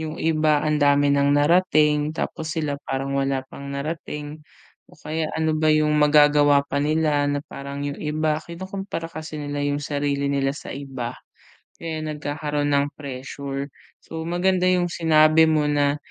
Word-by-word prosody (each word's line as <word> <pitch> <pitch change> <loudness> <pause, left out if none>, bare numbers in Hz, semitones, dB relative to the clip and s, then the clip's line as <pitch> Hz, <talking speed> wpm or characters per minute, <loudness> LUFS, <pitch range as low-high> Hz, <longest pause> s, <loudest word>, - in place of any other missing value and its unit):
yung 160 0 -5
iba 155 -2 +2
ang 155 0 +1
dami 145 0 +4
ng 140 0 +3
narating, 150 -1 +3
tapos 160 0 -4
sila 150 -3 -1
parang 135 +1 -2
wala 135 -1 0
pang 140 0 -9
narating, 150 +1 -5 0.4
o - - -23
kaya 155 +1 -3
ano 160 -1 0
ba 155 0 +3
yung 155 0 +2
magagawa 145 -1 +5
pa 140 - -5
nila 150 0 +1
na 145 0 -1
parang 140 0 -7
yung 145 0 -3
iba 155 0 -1
kinukompara 190 0 -6
kasi 155 -2 -7
nila 145 0 -3
yung 145 0 -1
sarili 140 -1 -1
nila 140 0 0
sa - - -9
iba 135 -3 -6 0.7
kaya 160 -1 -4
nagkakaroon 150 -1 -2
ng 140 0 +2
pressure. 140 0 -6 0.3
So 160 0 -8
maganda 180 +2 +1
yung 180 -1 +2
sinabi 160 -1 +4
mo 155 -1 +2
na, 145 -1 +1
150 Hz, 155 wpm, -23 LUFS, 145-155 Hz, 0.7 s, magagawa